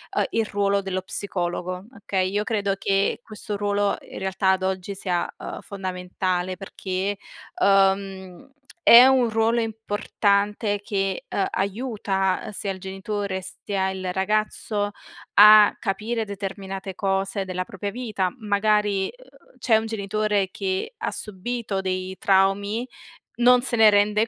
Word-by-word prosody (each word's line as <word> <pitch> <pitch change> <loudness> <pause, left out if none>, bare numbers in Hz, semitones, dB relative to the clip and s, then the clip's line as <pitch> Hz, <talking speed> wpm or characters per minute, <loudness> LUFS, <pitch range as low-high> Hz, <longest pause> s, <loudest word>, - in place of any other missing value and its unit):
uhm - - +3
il 225 -1 0
ruolo 200 -1 +1
dello 185 -1 -3
psicologo, 180 -1 -3
okay? 190 -2 -1
Io 205 +1 0
credo 205 -3 -1
che 195 0 +1
questo 210 -1 -5
ruolo 205 0 0
in - - -10
realtà 190 0 +1
ad 190 0 0
oggi 190 +1 -2
sia 180 -3 -1
uhm - - -7
fondamentale 185 -1 -3
perché 195 +1 -3 0.4
uhm 195 +2 +1 0.3
è 240 +2 +10
un 260 -3 +4
ruolo 225 +1 +2
importante 205 -1 0
che 195 -3 -2
uhm 195 - 0
aiuta 195 -2 -1
uhm - - -6
sia 200 -1 -2
il 190 - -7
genitore 195 0 -4 0.2
sia 190 -2 -1
il 185 -1 -4
ragazzo 205 +1 -1 0.4
a 210 0 +8
capire 220 +2 -2
determinate 195 -1 -6
cose 195 0 -1
della 185 0 -3
propria 200 +2 -5
vita. 210 -6 -2
Magari 210 -2 +1
uhm - - -21
c'è 225 -3 +4
un 220 - -2
genitore 210 -2 -1
che 190 - -3
ha - - -3
subito 210 0 -3
dei 185 0 -3
traumi, 200 +5 +2 0.5
non 245 +1 +5
se 250 - 0
ne 220 -1 +7
rende 210 +2 +3
200 Hz, 135 wpm, -24 LUFS, 190-215 Hz, 0.5 s, è